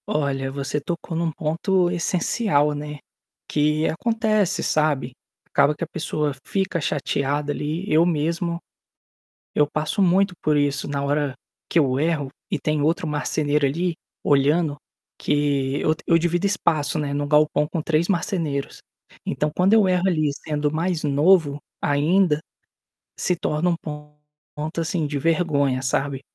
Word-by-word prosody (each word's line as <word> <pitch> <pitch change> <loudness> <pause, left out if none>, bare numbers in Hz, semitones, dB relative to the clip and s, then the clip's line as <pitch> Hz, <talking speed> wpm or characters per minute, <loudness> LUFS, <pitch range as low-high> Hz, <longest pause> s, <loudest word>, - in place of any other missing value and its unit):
Olha, 135 -3 -1
você 140 +1 -3
tocou 170 +2 -4
em 165 - 0
um 165 -1 0
ponto 175 +4 +1
essencial, 170 -3 +1
né, 150 0 -6 0.5
que 150 +1 +1
acontece, 215 0 +1
sabe, 145 -5 +1 0.3
acaba 145 +1 +3
que - - -5
a - - -2
pessoa 150 -3 -2
fica 190 -4 -1
chateada 145 0 -1
ali. 155 +5 -3
Eu 155 +2 +5
mesmo, 170 +1 0 1.0
eu 150 - +3
passo 155 +7 -1
muito 190 +1 +3
por 150 -1 +2
isso 145 -1 0
na 140 -1 -2
hora 145 -1 0 0.3
que - - +1
eu 135 -4 +3
erro 150 -3 0 0.2
e - - 0
tem 155 -1 -1
outro 165 +5 +1
marceneiro 150 -1 0
ali, 170 +5 -1 0.3
olhando 145 +2 +2 0.4
que 145 -2 0
eu 155 - +2
eu 165 - +5
divido 175 +3 +1
espaço, 165 -7 0
né, 145 -2 -2
no 145 0 -1
galpão 150 0 +3
com 165 +1 -3
3 160 +2 +1
marceneiros. 165 -6 -2 0.5
Então 150 0 -1
quando 185 +3 +3
eu 215 -3 +5
erro 180 0 +2
ali 155 -5 +1
sendo 150 0 -2
mais 165 +1 -1
novo, 150 0 +3 0.2
ainda, 150 +3 +2 0.8
se 180 - +1
torna 175 0 0
um - - +1
ponto, 150 +1 -8
assim, 165 -2 -1
de 145 0 -3
vergonha, 145 -4 +1
sabe? 135 +1 -1
150 Hz, 145 wpm, -23 LUFS, 145-170 Hz, 1.0 s, Eu